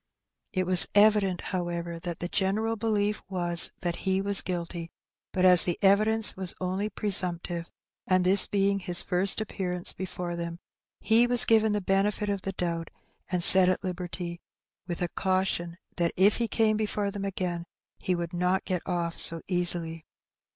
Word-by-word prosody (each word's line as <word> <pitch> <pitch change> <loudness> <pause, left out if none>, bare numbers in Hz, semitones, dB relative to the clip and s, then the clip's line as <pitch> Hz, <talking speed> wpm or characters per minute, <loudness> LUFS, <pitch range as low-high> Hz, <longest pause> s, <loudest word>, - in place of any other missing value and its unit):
It 185 -2 -1
was 180 0 +4
evident, 205 -3 +4
however, 170 -2 -4
that 170 -1 -6
the 175 - -2
general 210 +5 0
belief 210 -1 -1
was 175 -2 +2
that 175 -2 -2
he 190 0 0
was 200 0 +1
guilty; 170 -1 -5 0.4
but 185 0 +1
as 180 -2 +8
the 175 - 0
evidence 215 +3 +4
was 190 -2 -3
only 185 +3 -2
presumptive, 175 -5 -1 0.4
and 185 -1 +2
this 190 +2 +5
being 200 0 +1
his 180 -1 -3
first 185 +3 +1
appearance 180 -4 -1
before 180 -1 -5
them, 170 0 -5 0.4
he 225 +3 +4
was 245 -1 +4
given 220 -1 +3
the 210 - -1
benefit 200 +2 0
of 200 -1 -2
the 195 - -4
doubt, 170 -3 -3 0.4
and 180 -2 0
set 185 +1 +6
at 185 - -1
liberty, 175 -1 -5 0.5
with 175 0 -3
a - - 0
caution 185 -2 -1 0.2
that 170 -2 +1
if 195 +3 +4
he 235 - -1
came 215 -1 +1
before 210 -1 -2
them 200 -1 -5
again 180 -3 -3 0.3
he 185 - -1
would 170 0 -5
not 180 +2 0
get 185 -3 -2
off 170 -2 -2
so 165 -1 +1
easily. 175 -3 -2
185 Hz, 165 wpm, -27 LUFS, 175-200 Hz, 0.5 s, as